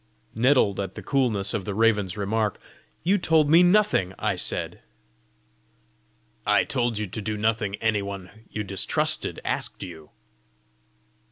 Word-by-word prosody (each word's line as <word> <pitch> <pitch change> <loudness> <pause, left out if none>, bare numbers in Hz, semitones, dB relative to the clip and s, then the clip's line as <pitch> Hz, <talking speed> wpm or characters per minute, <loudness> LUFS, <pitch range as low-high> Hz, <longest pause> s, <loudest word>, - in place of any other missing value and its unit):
Nettled 115 -4 +3
at 95 -1 -4
the - - -8
coolness 120 -8 0
of 100 - -2
the 100 +1 -4
raven's 105 -3 +2
remark, 105 +1 -1 0.4
"You 195 +4 +3
told 160 -3 +3
me 165 +2 +8
nothing!" 180 - +3
I - - 0
said. - - -3 1.6
"I - - +3
told 120 -4 -1
you 105 - -1
to 105 +3 -5
do 110 +1 -3
nothing 110 -1 0
any 110 -1 0
one 100 +2 -8
you 105 - -4
distrusted 100 -1 0
asked - - -3
you!" 80 -5 -10
110 Hz, 140 wpm, -25 LUFS, 100-125 Hz, 1.6 s, me